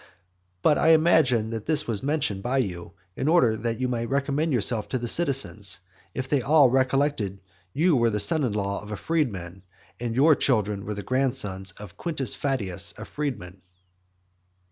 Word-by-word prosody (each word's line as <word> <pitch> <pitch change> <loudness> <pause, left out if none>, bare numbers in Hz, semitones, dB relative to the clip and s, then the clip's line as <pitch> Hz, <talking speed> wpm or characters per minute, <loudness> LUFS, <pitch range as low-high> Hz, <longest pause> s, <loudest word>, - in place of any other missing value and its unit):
But 150 - +4
I 160 - +5
imagine 140 -9 +3
that 115 -2 -6
this 155 -1 +1
was 110 -4 -2
mentioned 140 -9 -1
by 125 +5 -1
you, 90 -9 -3 0.2
in 135 - -3
order 155 -9 +4
that 115 +1 -3
you 130 - 0
might 115 -2 -3
recommend 140 +3 0
yourself 115 -3 +2
to 130 - -1
the 120 -1 -4
citizens, 115 - 0 0.4
if 130 0 -3
they 140 -1 +1
all 140 0 +4
recollected 130 -6 0
that - - -29 0.3
you 165 +2 +2
were 120 -2 +3
the 105 -1 -2
son 160 +7 +4
in 120 -5 -1
law 100 -1 -2
of 105 - -10
a 105 - -4
freedman, 95 - -3 0.4
and 120 -1 -3
that - - -5
your 155 +4 +6
children 105 -8 0
were 105 - -3
the 100 - -6
grandsons 110 -8 0
of 100 -2 -12
Quintus 140 -6 0
Fadius 100 -10 -2
a - - -8
freedman. 95 -11 -6
125 Hz, 185 wpm, -25 LUFS, 105-140 Hz, 0.4 s, your